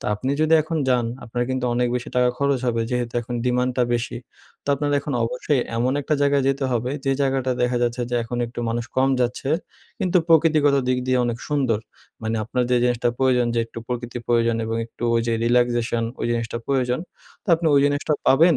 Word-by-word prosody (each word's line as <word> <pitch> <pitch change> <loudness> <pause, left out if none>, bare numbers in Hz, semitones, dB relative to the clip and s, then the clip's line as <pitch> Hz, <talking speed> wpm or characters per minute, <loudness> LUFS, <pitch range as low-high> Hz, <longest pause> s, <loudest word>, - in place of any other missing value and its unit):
তো - - -12
আপনি 130 +6 -3
যদি 155 +1 +4
এখন 160 +2 -3
যান 125 -2 +2 0.2
আপনার 120 +1 -2
কিন্তু 130 -1 -1
অনেক 125 0 +1
বেশি 125 - -5
টাকা 125 0 +4
খরচ 140 -1 +2
হবে 115 -1 +1
যেহেতু 120 -1 -2
এখন 120 +1 -6
ডিমান্ডটা 125 0 +1
বেশি, 120 0 -2 0.5
তো - - -10
আপনার 145 +1 -2
এখন 145 - -5
অবশ্যই 125 +3 0 0.2
এমন 125 +2 +1
একটা 150 - 0
জায়গায় 140 -1 +3
যেতে 135 0 0
হবে 120 +1 -1
যে 135 - +2
জায়গাটা 135 -2 +1
দেখা 125 0 +1
যাচ্ছে 120 +1 0
যে - - -1
এখন 120 +1 -4
একটু 120 +1 -7
মানুষ 115 +1 -2
কম 130 +1 +4
যাচ্ছে। 125 +3 -1 0.5
কিন্তু 180 0 +2
প্রকৃতিগত 155 -3 +4
দিক 130 0 +2
দিয়ে 130 0 +2
অনেক 120 -1 -2
সুন্দর। 135 -7 +1 0.4
মানে 110 0 -1
আপনার 125 +3 -1
যে 125 - +4
জিনিসটা 120 -1 +1
প্রয়োজন 125 -2 +3
যে - - +1
একটু 115 - -9
প্রকৃতির 120 -1 -4
প্রয়োজন 115 -1 +2
এবং 115 0 -2
একটু 115 - -14
ওই 115 - +3
যে 115 - +1
রিল্যাক্সেশন 120 -1 +2 0.2
ওই - - 0
জিনিসটা 115 0 -2
প্রয়োজন। 130 -2 0 0.4
তো - - -17
আপনি 165 0 -2
ওই 140 - +6
জিনিসটা 145 +1 +1
পাবেন 165 +4 +5
125 Hz, 205 wpm, -23 LUFS, 120-135 Hz, 0.5 s, ওই